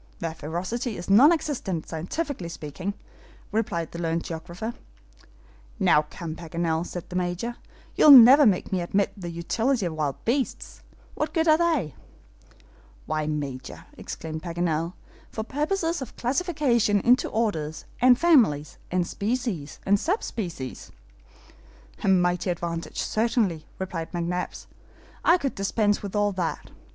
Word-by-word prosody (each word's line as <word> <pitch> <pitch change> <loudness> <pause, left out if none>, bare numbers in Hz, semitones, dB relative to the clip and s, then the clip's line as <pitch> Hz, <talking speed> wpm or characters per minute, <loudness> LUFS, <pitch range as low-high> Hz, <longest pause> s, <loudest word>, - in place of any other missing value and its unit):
"Their 165 -1 -4
ferocity 185 - -4
is 175 +3 -4
non 260 +11 +8
existent, 255 - -2
scientifically 180 - -4
speaking," 170 +5 -5 0.6
replied 200 -7 -1
the 170 - -7
learned 165 0 -1
geographer. 175 +7 -6 1.0
"Now 150 0 +3
come, 165 -3 -6
Paganel," 165 0 -2
said 175 - -7
the 180 - -8
Major, 180 +7 -2 0.4
"you'll - - +6
never 270 +1 +10
make 190 -4 +1
me 185 -2 0
admit 195 +3 0
the 180 -4 -6
utility 220 +8 0
of 170 - -2
wild 150 -3 -1
beasts. 260 +3 -2 0.3
What - - -3
good 325 0 +2
are 310 0 +5
they?" 315 - +1 1.1
"Why, 155 -1 -2
Major," 140 -4 -5
exclaimed 160 -1 -6
Paganel, 170 -1 -1 0.4
"for 220 - -4
purposes 325 - -1
of 260 - -7
classification 255 - +1
into 250 +4 +3
orders, 165 -9 -2 0.2
and 250 0 +7
families, 230 - +3
and 180 -1 +1
species, 210 - -3
and 200 +1 +3
sub 375 - 0
species." 170 - -6 1.1
"A - - 0
mighty 180 -1 +2
advantage, 170 -1 -3
certainly!" 215 -8 0
replied 180 -3 -5
McNabbs, 175 +1 -3 0.6
"I 345 - +5
could 275 -6 -2
dispense 205 +1 +1
with 200 0 -6
all 205 0 +2
that. 180 -4 -3
185 Hz, 135 wpm, -25 LUFS, 165-240 Hz, 1.1 s, never